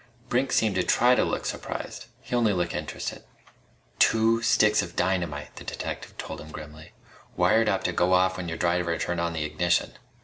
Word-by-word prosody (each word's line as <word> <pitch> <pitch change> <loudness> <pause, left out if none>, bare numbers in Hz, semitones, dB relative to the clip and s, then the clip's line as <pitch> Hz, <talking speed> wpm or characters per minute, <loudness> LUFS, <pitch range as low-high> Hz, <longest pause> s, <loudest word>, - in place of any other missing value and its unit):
Brink 130 +2 +1
seemed 110 -3 +2
to 90 - +2
try 125 +6 +4
to - - +3
look - - -2
surprised. - - -5
He - - -4
only 115 -4 +3
looked 90 -2 -1
interested. - - -5 0.8
"Two 115 +1 +4
sticks 110 -2 +4
of 85 - -7
dynamite," 85 -6 -1
the - - -8
detective - - -6
told - - -6
him 80 - -11
grimly, 75 +1 -10 0.4
"wired 110 -1 +4
up 95 - 0
to 90 - 0
go 90 +2 +2
off 95 0 +3
when 90 -1 -5
your 80 - -4
driver 85 -1 +1
turned 85 0 -2
on 85 0 -1
the 80 -2 -2
ignition. 85 +3 0
90 Hz, 190 wpm, -26 LUFS, 85-110 Hz, 0.8 s, try